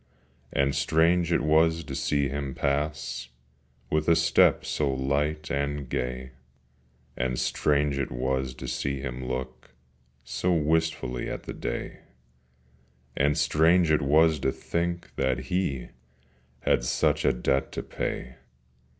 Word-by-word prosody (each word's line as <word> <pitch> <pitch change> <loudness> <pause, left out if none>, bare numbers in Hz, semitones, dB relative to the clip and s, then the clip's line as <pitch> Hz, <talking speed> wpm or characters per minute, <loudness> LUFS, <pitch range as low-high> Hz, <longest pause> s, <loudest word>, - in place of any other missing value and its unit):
And 70 0 +1
strange 85 +2 +2
it 85 - +2
was 80 +2 +3
to 70 -2 -7
see 70 +1 +1
him 70 0 -4
pass 70 -3 -2 0.6
With 75 0 +1
a 85 - +6
step - - +4
so 75 -2 0
light 70 +3 -1
and 70 0 -2
gay, 65 +1 -3 0.8
And 60 0 -1
strange 70 -1 +1
it 70 - -2
was 65 +1 -1
to 65 - -7
see 70 -1 -2
him 65 -2 -5
look 65 -1 -6 0.5
So 90 - -1
wistfully 80 -5 0
at - - -5
the - - -6
day, - - -5 1.2
And 75 +2 +2
strange 80 +3 +4
it 75 - +3
was 80 +3 +4
to 65 - +1
think 85 +3 -3
that 65 - +1
he 90 -9 -1 0.7
Had - - +2
such - - +1
a - - +4
debt 65 +2 0
to - - -4
pay. 65 0 -4
70 Hz, 135 wpm, -27 LUFS, 65-80 Hz, 1.2 s, a